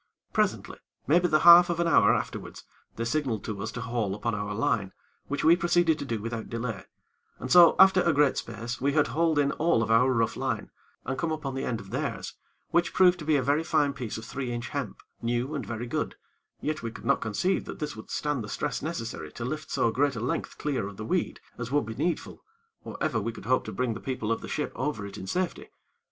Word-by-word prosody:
Presently, - - 0 0.3
maybe 175 +5 +4
the 155 -2 +3
half 175 +1 +9
of 170 -1 -1
an 170 - +2
hour 165 - +5
afterwards, - - -3 0.3
they 115 - -3
signaled 125 -5 -1
to 105 -3 -5
us 110 - -3
to 120 - -5
haul 115 -4 -2
upon 115 +2 -2
our 105 0 -3
line, 100 -3 0 0.3
which 145 - -2
we 165 +2 +7
proceeded 175 -2 +2
to - - -4
do 115 -4 -2
without 115 +1 -5
delay, 115 -4 -4 0.5
and 130 - -6
so, 175 -2 +8
after 190 -1 +7
a 170 - +3
great 145 -2 +3
space, 115 +2 -5
we 140 +1 +1
had 150 -1 +3
hauled 160 -1 +1
in 140 -1 +3
all 160 -8 +2
of 110 - -2
our 125 +4 +5
rough 115 -2 +1
line, - - -3 0.3
and 130 +1 -3
come 165 - -1
upon 150 -4 -3
the 135 - -3
end 115 -2 -2
of 100 -3 -11
theirs, - - -3 0.4
which 170 0 +1
proved 180 -1 +5
to 155 - -7
be 155 -1 +3
a 145 +3 +2
fine 150 -4 +2
piece 120 -6 -5
of 110 - -8
three 130 0 -4
inch 120 0 -4
hemp, - - -4 0.2
new 120 +4 -1
and 135 -9 -4
very 115 +1 -4
good; 120 - -3 0.5
yet 155 0 -2
we 115 - -3
could 115 - -11
not - - +2
conceive 175 - 0
that - - -7
this 150 -1 -4
would 110 - -11
stand 150 -5 -1
the 105 - -8
stress 145 - -2
necessary 115 - -5
to 120 - -6
lift 155 +4 -4
so 115 - +1
great 140 +2 +1
a - - -3
length 120 - -3
clear 140 -9 -2
of 100 -1 -10
the 110 - -6
weed, 180 +8 -1 0.2
as 115 0 -4
would 145 -2 +2
be 110 - -5
needful, 170 +9 -3 0.4
or - - -8
ever 115 - 0
we 115 +3 -2
could 110 - -11
hope 130 +3 +2
to - - -6
bring 125 -2 -1
the 110 - -7
people 125 -4 -3
of 115 - -1
the - - -7
ship 150 - -2
over 130 -6 -3
it 100 - -8
in 95 - -7
safety. 180 - -2
130 Hz, 235 wpm, -27 LUFS, 115-155 Hz, 0.5 s, half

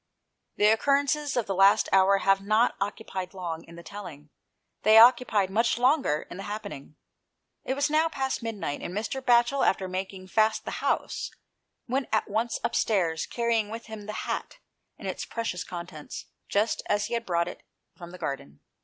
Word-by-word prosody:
The 210 - +2
occurrences 280 +4 +2
of 235 - +1
the 195 - -2
last 195 +1 +5
hour 195 +1 +5
have 195 0 +2
not 215 +4 +3
occupied 195 -2 -4
long 165 -3 -5
in 170 - -13
the 170 - -11
telling; 165 -8 -10 0.5
they 215 +1 +6
occupied 225 -5 +6
much 230 +4 +2
longer 250 - +2
in - - -9
the - - -6
happening. 205 -9 -7 0.7
It 265 - -1
was 285 +1 +2
now 310 +2 +2
past 265 -4 -2
midnight, 210 -10 -4
and 180 - -6
Mr. 225 +5 -3
Batchel, 245 +2 +3
after 190 -1 +2
making 185 0 -5
fast 220 +1 +2
the - - -5
house, - - -1 0.6
went 260 +2 -1
at 215 - +1
once 225 +3 -1
upstairs, 170 -7 0
carrying 230 -3 0
with 225 +1 -7
him 220 -2 -9
the 215 - -4
hat - - -4 0.4
and - - -7
its - - -3
precious 220 -7 -3
contents, 170 -4 -8 0.2
just 210 +3 +1
as 205 0 +1
he - - -5
had 235 0 -1
brought 170 -1 +1
it 180 - -8 0.3
from 175 -1 -10
the 180 - -10
garden. 140 - -5
210 Hz, 175 wpm, -27 LUFS, 185-235 Hz, 0.7 s, they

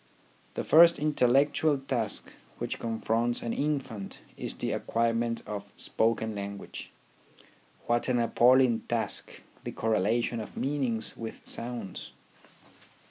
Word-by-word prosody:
The - - -2
first 170 +1 +7
intellectual 145 +1 +3
task 125 -5 -2 0.2
which - - -4
confronts 115 +1 0
an 115 - -2
infant 135 -9 -3
is - - -3
the - - -2
acquirement 115 0 0
of 100 -1 -6
spoken 110 -1 +1
language. 100 0 -6 1.0
What 120 +2 +1
an 125 - +2
appal 120 +2 +5
ling 125 -4 +4
task, 115 -1 -1 0.2
the - - -4
correlation 115 +2 +1
of 110 - -8
meanings 130 -6 -1
with 115 -1 -8
sounds 115 -6 -4
115 Hz, 115 wpm, -29 LUFS, 110-130 Hz, 1.0 s, first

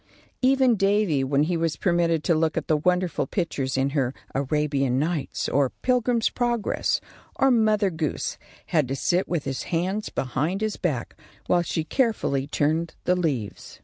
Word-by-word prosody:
Even 260 -2 +4
Davy, 195 -8 +2
when 140 +2 +2
he 170 +3 0
was 165 -2 0
permitted 170 -2 +1
to 170 - +3
look 160 0 +1
at - - -1
the 155 - +3
wonderful 180 -2 0
pictures 140 -8 -2
in 135 +1 +1
her 135 -3 0 0.2
"Arabian 140 -2 0
Nights," 155 0 -1
or 140 -1 +2
"Pilgrim's 245 -2 +2
Progress," 240 -3 0 0.4
or 270 0 +3
"Mother 215 -4 +3
Goose," 160 -3 -3 0.3
had 155 -5 +1
to 135 - -2
sit 175 +6 +1
with 170 -5 -1
his 135 -2 -3
hands 190 +5 -1
behind 150 +9 -2
his 215 -1 -1
back 145 -10 -2 0.3
while 175 - +3
she 165 -1 -2
carefully 160 - 0
turned 155 +3 0
the 180 - +2
leaves. 140 - -3
165 Hz, 160 wpm, -25 LUFS, 140-195 Hz, 0.4 s, Even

